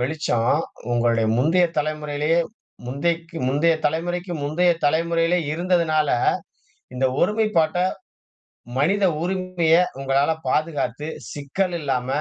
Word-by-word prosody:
வெளிச்சம் 125 -4 0 0.4
உங்களுடைய 115 -1 +2
முந்தைய 165 +8 +3
தலைமுறையிலேயே, 150 +1 0 0.5
முந்தைக்கு 165 +6 -2
முந்தைய 155 +5 +3
தலைமுறைக்கு 175 +4 -2
முந்தைய 175 +5 +2 0.2
தலைமுறையிலேயே 165 +3 +1
இருந்ததுனால, 165 -3 +1 0.9
இந்த 130 +1 +1 0.2
ஒருமைப்பாட்ட 210 -6 +2 1.0
மனித 195 +8 +2 0.2
உரிமைய 180 -2 +1 0.3
உங்களால 135 +2 +2 0.2
பாதுகாத்து 150 -2 -1 0.3
சிக்கல் 175 +6 -2
இல்லாம 130 -4 -1
160 Hz, 90 wpm, -22 LUFS, 145-175 Hz, 1.0 s, முந்தைய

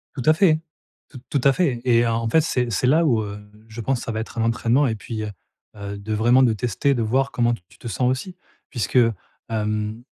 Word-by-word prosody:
Tout 135 - -4
à 155 - +6
fait, 160 -2 +3 0.5
t 135 - -11
tout 140 - 0
à 140 - +6
fait 135 -8 0
et 120 -1 +3
en 115 0 -1
fait, 160 - +4
c'est 125 -6 -1
c'est 115 +5 +1
là 155 +6 +4
où, 120 -7 +3
heu, 100 -1 -6 0.3
je 115 +1 -8
pense 130 +2 0
ça - - -4
va 110 - -2
être 110 - -9
un 115 - +1
entraînement 115 +4 +2
et 110 - -1
puis, 110 +1 -6
heu, 105 - -4 0.4
heu 100 0 -6
de 105 +2 -5
vraiment 120 +4 +4
de 120 -3 +3
tester, 120 +5 0
de 120 - -1
voir 130 +5 +1
comment 120 0 +1
t 115 - -7
tu - - -21
te 120 - -9
sens 125 +2 0
aussi, 135 +8 -3 0.3
puisque, 115 +1 -2 0.5
hem, 105 +1 -2
120 Hz, 235 wpm, -22 LUFS, 110-130 Hz, 0.5 s, à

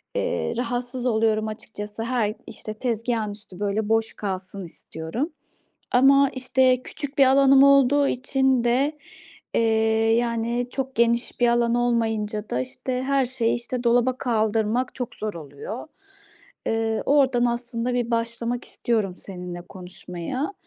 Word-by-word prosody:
Eee, - - -1
rahatsız 245 +1 -3
oluyorum 220 -2 +2
açıkçası. 210 0 -7
Hay 230 -4 0
işte 215 -1 -7
tezgâhın 230 -2 -1
üstü 205 -3 -13
böyle 205 +1 -1
boş 225 0 +1
kalsın 190 -1 -5
istiyorum 170 - -5 0.6
ama 275 +2 +6
işte 260 -1 +2
küçük 285 -1 -7
bir 275 - +8
alanım 270 0 +6
olduğu 280 0 +5
için 265 -1 +1
de, 270 +5 +1 0.6
eee, - - +3 0.6
yani 235 +1 -1
çok 265 -1 -4
geniş 235 +1 +1
bir 245 - +4
alan 235 0 +2
olmayınca 225 -3 0
da 125 - -1
işte 250 - -4
her 275 0 +2
şeyi, 240 -2 0
işte, 240 +1 -4
dolaba 245 +1 +3
kaldırmak 225 0 0
çok 250 -3 -5
zor 215 -1 -4
oluyor. 160 - -8 0.8
Eee, 225 0 0
oradan 265 -4 +3
aslında 240 0 -2
bir 245 -1 -1
başlamak 235 +1 -2
istiyorum 210 -6 -1
seninle 180 -2 -8
konuşmaya. 180 - -6
235 Hz, 130 wpm, -24 LUFS, 215-255 Hz, 0.8 s, bir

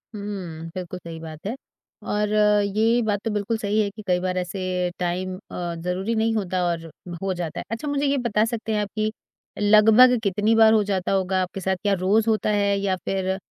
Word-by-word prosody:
हुँ, 185 -6 -6
बिल्कुल 180 0 -5
सही 165 -2 -8
बात 160 +1 -10
है। 230 - -2 0.6
और 210 0 0 0.5
ये 230 +3 +3
बात 205 -2 0
तो 225 - 0
बिल्कुल 210 +2 -1
सही 210 0 0
है 200 - 0
कि 215 +2 -11
कई 180 -1 +2
बार 185 0 -2
ऐसे 180 0 -2
टाइम 180 +1 -2 0.2
अ, 175 -1 -4
ज़रूरी 180 +6 -2
नहीं 225 +1 +1
होता 185 -3 -1
और 165 -1 -2 0.4
हो 195 -1 -1
जाता 175 -3 -4
है। - - -5
अच्छा, 230 +6 -4
मुझे 285 0 0
ये 280 0 +2
बता 220 -4 +1
सकते 225 -1 -3
हैं 210 - +1
आप 205 - -3
कि 215 0 0 0.5
लगभग 220 +4 +6
कितनी 210 +3 +2
बार 220 0 +6
हो 215 -2 +4
जाता 195 -2 -1
होगा 190 -1 +1
आपके 185 +1 -4
साथ? 190 +1 0
क्या 200 -1 +2
रोज़ 205 +5 +2
होता 215 -1 +1
है 200 -1 +2
या 195 -1 0
फिर 190 0 -1
200 Hz, 210 wpm, -23 LUFS, 185-220 Hz, 0.6 s, लगभग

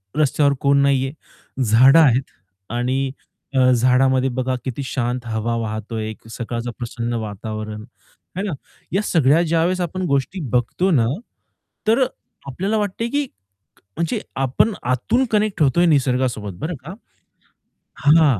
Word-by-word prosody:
रस्त्यावर 145 -1 +3
कोण 140 0 +4
नाहीये. 135 -1 +2 0.5
झाडं 130 +8 +6
आहेत 135 -3 +3 0.5
आणि 130 +2 0 0.5
अ, 130 0 +5
झाडामध्ये 130 +2 +3
बघा 130 +1 -1
किती 130 +1 -3
शांत 125 -2 -2
हवा 115 +1 -1
वाहतोय, 110 0 -4 0.2
सकाळचं 120 0 -4
प्रसन्न 120 0 -4
वातावरण, 110 +1 -6 0.6
है - - 0
ना. 195 -6 -2 0.4
या 195 - +2
सगळ्या 155 -2 +4
ज्यावेळेस 170 +3 +1
आपण 185 +2 -3
गोष्टी 140 +7 0
बघतो 125 +10 +1
ना, 125 -9 +4 0.8
तर 230 +4 +4
अ, - - +1 0.4
आपल्याला 195 +11 -1
वाटतंय, 210 +2 -1
की 290 +2 0 0.7
म्हणजे 170 -2 -1 0.3
आपण 165 - +2 0.2
आतून 230 - +1
कनेक्ट 210 -4 +1
होतोय 150 +6 +3
निसर्गासोबत 125 - +1
बरं 165 +2 -3
का. 180 - -6 1.0
हां, 150 -6 +4
135 Hz, 125 wpm, -21 LUFS, 120-165 Hz, 1.0 s, झाडं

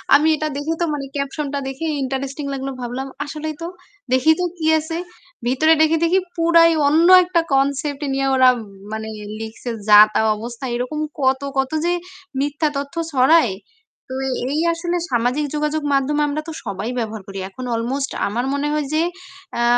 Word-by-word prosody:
আমি 295 +2 +4
এটা 310 0 -2
দেখে 295 +3 -2
তো - - +3
মানে 280 -2 -3
caption 280 +1 -2
টা 285 - 0
দেখে 270 +4 -5 0.2
ইন্টারেস্টিং 270 +2 -3
লাগলো। 275 0 -4
ভাবলাম, 250 +2 -4 0.2
আসলেই 310 +1 -5
তো 335 - -3 0.5
দেখি 260 +5 +5
তো 360 - +1
কি 320 - -4
আছে। 320 +2 -4 0.5
ভিতরে 310 +6 +4
দেখি 315 +1 +4
দেখি 350 +3 +4 0.2
পুরাই 335 0 +5 0.2
অন্য 320 +4 +4 0.2
একটা 350 -1 +1
concept 280 +1 0
নিয়ে 270 0 0
ওরা 260 -1 +6 0.4
মানে 220 0 -4 0.3
লিখছে। 225 +2 -7 0.2
যা 210 -1 +9
তা - - +2 0.2
অবস্থা। 235 +3 -7
এরকম 250 +5 -3 0.2
কত, 265 0 +2 0.2
কত 265 0 +1
যে 350 - +2 0.5
মিথ্যা 290 +2 0
তথ্য 280 +3 -5 0.2
ছড়ায়। 260 - +4 0.6
তো - - -3 0.4
এই 305 - 0
আসলে 345 +1 -2
সামাজিক 250 +5 +1
যোগাযোগ 300 +1 -1
মাধ্যমে 280 +2 +1
আমরা 295 +1 -2
তো - - -4
সবাই 200 +3 -4
ব্যবহার 220 -2 -4
করি 195 0 -6
এখন 255 +6 -8
almost 265 +5 -2 0.2
আমার 235 +5 -2
মনে 280 +1 -1
হয় 300 -1 0
যে 310 - +3 0.5
অ্যা 235 - 0
280 Hz, 170 wpm, -20 LUFS, 255-310 Hz, 0.6 s, যা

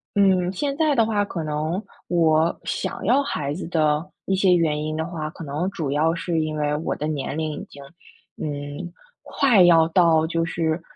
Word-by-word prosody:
嗯， 190 -3 +3
现 280 +7 -2
在 310 -3 +2
的 230 -3 +4
话， 210 -2 0
可 170 -5 -5
能 155 +6 -2 0.2
我 165 -1 +2
想 - - -4
要 255 +7 +4
孩 145 - -3
子 - - -6
的 155 -2 +1 0.2
一 195 - 0
些 190 -1 +4
原 155 -3 +1
因 155 0 -3
的 160 0 -2
话， 160 -3 -5
可 165 +1 -10
能 150 +6 -2
主 155 -7 -3
要 160 +3 +2
是 170 -1 -1
因 155 -1 -2
为 150 -1 0
我 155 - -2
的 150 - -4
年 150 -1 -3
龄 155 -1 -2
已 - - -7
经， 140 - -13 0.6
嗯， 145 +4 -5 0.3
快 245 -8 +3
要 165 -2 +6
到 165 -2 +4
就 165 0 -1
是 165 0 -1
165 Hz, 210 characters per minute, -23 LUFS, 155-180 Hz, 0.6 s, 要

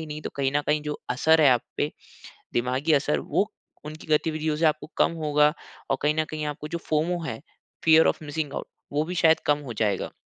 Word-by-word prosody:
ही 160 - -6
नहीं, 150 0 -6
तो - - -5
कहीं 135 -1 0
न - - +3
कहीं 150 0 +1
जो 150 0 -5
असर 160 +5 +4
है 150 - +7
आप 125 -2 +3
पे, 145 - 0 0.6
दिमागी 130 +6 +1
असर, 145 +1 +2
वो 210 +3 -1 0.3
उनकी 155 +1 -9
गतिविधियों 155 0 +1
से 165 - +2
आपको 155 0 +1
कम - - +3
होगा। 150 0 +4 0.4
और 135 - +1
कहीं 150 +1 +2
न - - +3
कहीं 155 -1 -4
आपको 150 0 -5
जो 170 - -3
फोमो 165 +3 +1
है, 115 -5 -5 0.4
फियर 160 0 +6
ऑफ़ - - -1
मिसिंग 145 -1 -3
आउट, - - -5 0.3
वो 150 - +2
भी 180 - -5
शायद 160 -2 +4
कम 145 0 +3
हो 120 - -5
जाएगा। 100 -2 -1
150 Hz, 220 wpm, -25 LUFS, 145-160 Hz, 0.6 s, है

